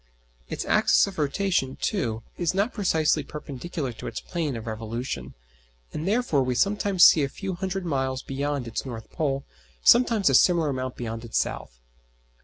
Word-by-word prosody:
Its - - -4
axis - - +4
of 195 -4 -7
rotation, 150 -2 0
too, 115 - -1
is 175 0 -1
not 200 +5 +1
precisely 160 -7 +2
perpendicular 150 -2 -5
to - - -8
its 115 - -4
plane 160 -6 -3
of 115 0 -6
revolution, 115 +2 -5 0.6
and 160 - -4
therefore 210 - +2
we 125 -1 0
sometimes 200 +2 +4
see 155 - +7
a 140 - -1
few 195 +5 -5
hundred 190 +1 -3
miles 135 -4 -1
beyond 140 -1 -3
its 110 - -3
north 115 -4 -8
pole, 140 -4 -1 0.4
sometimes 230 -5 +5
a 135 - +4
similar 165 +2 +4
amount 130 -1 -3
beyond 115 -1 -5
its 115 - -3
south. - - -3
145 Hz, 165 wpm, -26 LUFS, 125-185 Hz, 0.6 s, see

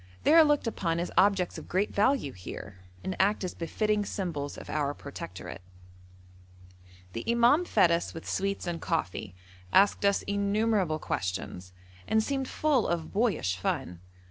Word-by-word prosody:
They - - +5
are 330 0 +9
looked 295 -3 +2
upon 170 -7 -1
as 175 - -3
objects 195 -1 +3
of - - -12
great 190 +3 0
value 215 - +2
here, 95 -1 -9 0.2
and 190 - -3
act 205 +2 +2
as 180 - -3
befitting 210 +5 0
symbols 165 -8 -4
of - - -9
our 145 -1 -1
protectorate. 95 -10 -8 1.5
The 115 - -4
imam 235 +9 +4
fed 195 - +4
us 170 +1 0
with 165 - -9
sweets 195 0 -1
and 170 -2 -3
coffee, 110 - -2 0.4
asked 200 - +4
us 200 0 +3
innumerable 200 -4 +1
questions, 95 -6 -4 0.4
and 220 0 +3
seemed 270 +1 -2
full 290 -6 +1
of 170 -2 -2
boyish 200 - +1
fun. 90 -1 -2
190 Hz, 150 wpm, -29 LUFS, 155-215 Hz, 1.5 s, are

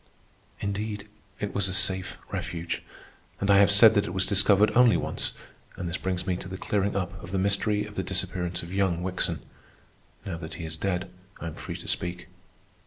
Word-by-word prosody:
Indeed, 105 +1 -3 0.3
it 105 - -3
was 100 -1 +1
a 95 - -2
safe 95 0 +1
refuge. 85 -1 -3 0.6
I 100 0 +5
have 100 0 +6
said 105 +3 +9
that 100 -2 +2
it 90 - -5
was 95 - +3
discovered 100 +1 +4
only 120 -6 +6
once, - - -2 0.4
and 90 - -4
this 85 - -2
brings 90 -1 -2
me 95 -2 0
to 95 - -7
the 95 0 -6
clearing 100 0 0
up 95 0 -3
of - - -8
the 95 - -1
mystery 100 +2 +2
of 105 - -10
the 95 - -1
disappearance 90 -1 -2
of 85 +2 -8
young 95 -3 +1
Wickson. 90 0 -1 0.8
Now 85 -4 -4
that 80 -1 -7
he 85 - -6
is 80 0 -3
dead, 90 +1 -2 0.3
I - - -6
am 80 - -4
free - - -6
to - - -10
speak. 90 0 -3
95 Hz, 195 wpm, -27 LUFS, 90-100 Hz, 0.8 s, said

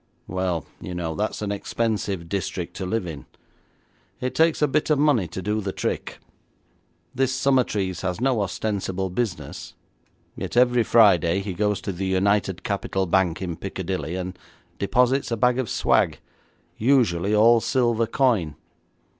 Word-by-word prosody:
'Well, 90 -3 -2 0.2
you 90 - -6
know, 85 -2 -3
that's 105 +3 -2
an 100 - -2
expensive 100 -4 -2
district 90 -1 -4
to 95 - -4
live 110 0 -1
in; 75 -6 -8 0.9
it 130 0 -2
takes 160 0 +3
a - - +5
bit 150 +3 0
of 150 - +4
money 140 - +3
to 95 +3 -7
do 105 +2 -1
the 100 -1 -3
trick. - - -3 1.0
This 130 0 +1
Summertrees 130 -8 +1
has 90 0 -2
no 125 -3 +1
ostensible 95 -1 -2
business, 105 -1 -4 0.6
yet - - -5
every 125 -1 +5
Friday 100 -6 +4
he 100 -1 -4
goes 105 +1 0
to 100 - -3
the 95 +1 -3
United 95 0 +1
Capital 95 -1 -1
Bank 90 0 +1
in 85 -3 -3
Piccadilly, 95 -4 -4
and 90 0 -5 0.4
deposits 125 +6 +2
a 115 - -1
bag 125 +3 +2
of 130 - -2
swag, - - +2 0.6
usually 105 -6 +2
all 115 +2 +6
silver 115 -1 +1
coin.' 110 - +1
100 Hz, 150 wpm, -24 LUFS, 95-120 Hz, 1.0 s, all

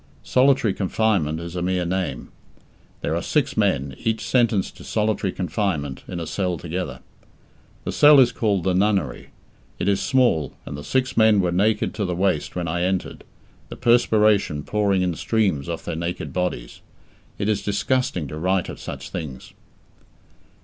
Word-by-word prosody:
"Solitary 130 -4 +3
confinement" 95 -6 0
is 85 +1 -7
a 90 - -2
mere 90 0 0
name. 90 -8 -3 0.7
There - - -1
are - - -1
six - - 0
men, 70 0 +1
each 110 -1 -1
sentenced 115 -6 +1
to - - -11
solitary 105 -3 0
confinement, 90 - -2
in 90 - -5
a 85 - -4
cell 90 0 -2
together. 80 -6 -5 0.8
The - - -3
cell 145 -1 +7
is 125 -2 +6
called 105 -6 0
the 95 0 +1
"nunnery". 95 - 0 0.5
It 90 - -2
is 100 -1 +2
small, 125 - +2
and - - -6
the 70 - -7
six 130 - 0
men 110 -2 +5
were 90 -2 +1
naked 105 +5 +1
to 105 - -2
the 90 -1 -2
waist 85 -6 0
when 90 -2 -2
I 85 +2 -1
entered, 95 +1 -2 0.5
the - - -7
perspiration 110 - +3
pouring 100 -1 +1
in 90 -1 0
streams 95 -5 0
off 85 - -5
their - - -3
naked 85 +2 -4
bodies! 90 -10 -3 0.6
It 100 - -2
is 105 -2 +1
disgusting 105 - -1
to 75 - -6
write 95 +2 0
of - - -8
such - - -7
things. 70 -7 -7
95 Hz, 165 wpm, -23 LUFS, 85-110 Hz, 0.8 s, cell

